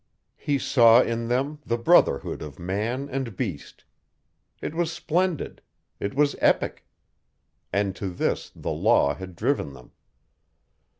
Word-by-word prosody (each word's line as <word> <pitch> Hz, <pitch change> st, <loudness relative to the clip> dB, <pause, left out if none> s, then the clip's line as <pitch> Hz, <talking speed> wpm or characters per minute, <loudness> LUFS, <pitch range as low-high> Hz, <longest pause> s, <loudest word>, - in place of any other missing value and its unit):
He 145 Hz, -2 st, 0 dB
saw 120 Hz, -3 st, +6 dB
in 115 Hz, 0 st, -2 dB
them 135 Hz, +5 st, -1 dB
the 115 Hz, -3 st, -1 dB
brotherhood 120 Hz, -, +3 dB
of 75 Hz, -1 st, -8 dB
man 105 Hz, +10 st, -2 dB
and 130 Hz, -6 st, -4 dB
beast. 90 Hz, -, -5 dB, 0.8 s
It -, -, -5 dB
was 170 Hz, 0 st, -1 dB
splendid. 175 Hz, 0 st, -1 dB, 0.4 s
It 100 Hz, -, -3 dB
was 145 Hz, 0 st, +2 dB
epic. -, -, +1 dB, 0.8 s
And 100 Hz, 0 st, 0 dB
to 100 Hz, -, -3 dB
this 90 Hz, -, -2 dB
the -, -, -4 dB
Law 70 Hz, -, +3 dB
had 95 Hz, +3 st, -9 dB
driven 115 Hz, -, -1 dB
them! 65 Hz, -, -15 dB
115 Hz, 130 wpm, -25 LUFS, 95-145 Hz, 0.8 s, saw